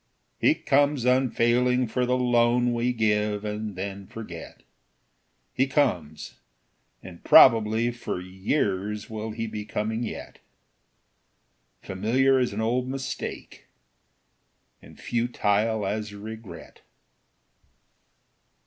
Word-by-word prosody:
He - - +4
comes 140 -2 +1
unfailing 125 0 +2
for 125 +2 -1
the 125 +1 +2
loan 120 0 +2
We 120 +1 0
give 105 -2 0
and 105 -1 -4
then 95 +1 -6
forget; 90 -7 -10 0.9
He 130 - +1
comes, 90 - -1 0.6
and 90 -2 -12
probably 115 -1 +6
for 120 -6 -5
years 100 +2 -2
Will 110 0 -5
he 115 +1 -4
be 105 -1 -5
coming 105 +2 -3
yet, 120 - -7 1.4
Familiar 130 +8 +2
as 125 - 0
an 105 +2 -3
old 125 +3 0
mistake, 135 0 -6 1.1
And - - -16
futile 110 -2 0
as 105 +1 -3
regret. 110 0 -10
110 Hz, 100 wpm, -25 LUFS, 105-125 Hz, 1.4 s, probably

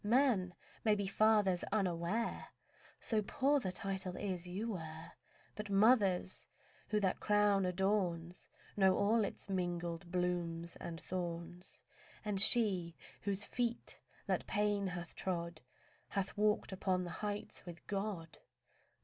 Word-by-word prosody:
Men 210 -6 +3 0.3
may 215 -2 +4
be 205 -1 -1
fathers 205 -3 +3
unaware, 195 +2 -1 0.5
So 220 -2 +2
poor 275 +7 +2
the 190 -8 -2
title 190 -1 -1
is 185 -3 -3
you 205 +6 -3
wear. 160 -4 -6 0.4
But 210 -1 -6
mothers—who 200 -1 +1
that 190 -3 +1
crown 205 -2 +3
adorns 180 -2 -1 0.3
Knows 190 -2 +4
all 220 +2 +3
its 200 - -5
mingled 175 -2 -2
blooms 175 -2 -1
and 165 -1 -6
thorns, 175 0 -5 0.4
And 200 -2 +2
she 190 -7 +4 0.3
whose 200 0 -2
feet 240 -1 -2 0.3
that - - -1
pain 205 -1 +1
hath 175 -1 -5
trod 170 -3 -3 0.5
Hath 195 -1 -2
walked 210 -1 +2
upon 185 -1 0
the 175 - -5
heights 205 -1 -4
with 170 -1 -9
God. 195 -5 -4
190 Hz, 125 wpm, -36 LUFS, 175-210 Hz, 0.5 s, may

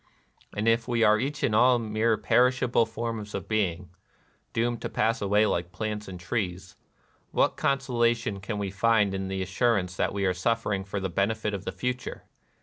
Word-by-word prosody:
And 105 +2 0
if 115 0 +2
we 120 -2 +1
are 105 0 +5
each 140 +4 -3
and 110 - +2
all 125 +3 +5
mere 110 0 +1
perishable 125 +2 +3
forms 115 -2 -4
of 100 -1 -5
being, 95 -5 -1 0.3
— - - -39
doomed 120 +1 -1
to - - -3
pass 115 +2 0
away 105 +2 +3
like 85 -3 -1
plants 105 +2 -4
and 90 -2 -8
trees, 90 -2 -3 0.3
— - - -38
what - - +2
consolation 120 -6 0
can 105 +2 -4
we 100 -2 -3
find 105 0 +2
in 95 0 -3
the 95 0 -2
assurance 95 -1 0
that - - +1
we 100 0 -1
are 95 - +2
suffering 105 +1 -1
for 100 +1 -4
the 95 0 -2
benefit 105 +4 -1
of 100 -1 -5
the - - -2
future 125 0 -4
105 Hz, 190 wpm, -27 LUFS, 95-115 Hz, 0.3 s, are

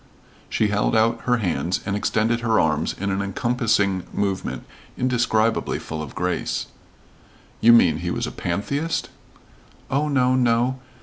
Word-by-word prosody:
She 110 - +1
held 105 +2 +1
out 115 +1 +2
her 125 -1 +3
hands 90 -4 -1
and 100 0 -1
extended 110 +3 +1
her 115 -2 +2
arms 75 0 +1
in 100 +1 -1
an 95 0 -1
encompassing 105 -2 0
movement 100 -2 -2 0.3
indescribably 115 -3 +1
full 80 -1 -6
of 75 - -8
grace. 90 0 -2 0.9
"You 115 - +6
mean 115 - +5
he - - -3
was - - -2
a - - -5
pantheist?" 140 - -2 0.8
"Oh, 145 +3 +1
no, 130 -3 +2
no. 125 +1 +2
110 Hz, 140 wpm, -23 LUFS, 100-125 Hz, 0.9 s, You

